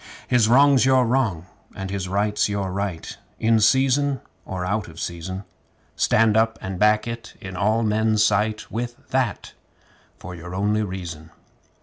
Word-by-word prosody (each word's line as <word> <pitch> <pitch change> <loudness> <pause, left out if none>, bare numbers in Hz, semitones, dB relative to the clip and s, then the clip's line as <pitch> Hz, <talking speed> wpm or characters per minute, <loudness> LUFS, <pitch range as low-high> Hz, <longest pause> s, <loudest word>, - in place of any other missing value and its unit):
His 120 -4 +3
wrong's 140 +1 +5
your 130 -1 +4
wrong, 115 -9 0 0.3
and 95 0 -5
his 95 -2 -3
right's 105 +2 0
your 100 -2 -2
right, 95 -3 -4 0.2
In 115 0 +3
season 135 +4 +3 0.3
or 90 -1 -4
out 100 +3 -1
of 80 0 -12
season. 90 +3 -5 0.5
Stand 110 -1 +3
up 115 0 +2
and 95 -1 -6
back 105 +2 +3
it 115 -1 -7
in 95 -1 -8
all 110 +4 +1
men's 110 0 +2
sight 105 +1 0
With 120 +1 -5
that 125 -7 -1 0.6
for 90 - -9
your 90 +1 -8
only 105 +2 +1
reason! 85 -6 -6
105 Hz, 150 wpm, -23 LUFS, 95-115 Hz, 0.6 s, wrong's